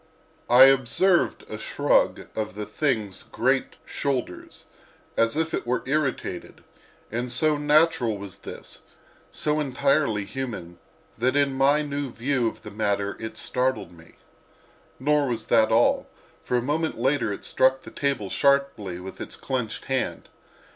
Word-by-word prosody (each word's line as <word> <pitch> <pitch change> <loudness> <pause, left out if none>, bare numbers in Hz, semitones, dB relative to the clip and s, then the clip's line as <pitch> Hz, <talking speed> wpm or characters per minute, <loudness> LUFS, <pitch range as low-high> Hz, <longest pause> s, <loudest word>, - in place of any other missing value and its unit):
I 125 +2 +9
observed 135 +8 +3
a - - -7
shrug - - +1
of 105 -3 -3
the 105 0 -4
thing's 110 -8 -1
great - - 0
shoulders, 130 -9 -4 0.5
as 115 +5 +2
if 160 0 -1
it - - -2
were 125 +1 0
irritated: 140 0 -2 0.5
and 120 +2 -2
so 155 +5 +2
natural 145 -6 +3
was 100 -1 -9
this—so 150 +8 -6
entirely 140 -6 +1
human—that 115 +2 -5
in 140 -1 +2
my 140 +3 +3
new 145 -2 -3
view 125 0 0
of - - -6
the 105 - -8
matter 100 -1 -1
it 110 0 -6
startled 125 -8 -1
me. 80 -1 -17 0.8
Nor 145 +1 +2
was 115 -3 -3
that 110 -2 +5
all, 115 +2 +3 0.4
for 125 - 0
a 120 - -1
moment 155 +4 -1
later 130 -2 +1
it 100 - -6
struck 130 0 +2
the - - -10
table 135 -9 -2
sharply 140 -10 +1
with 95 +1 -9
its - - -7
clenched 125 -4 -3
hand. 130 -1 -2
130 Hz, 140 wpm, -25 LUFS, 110-145 Hz, 0.8 s, I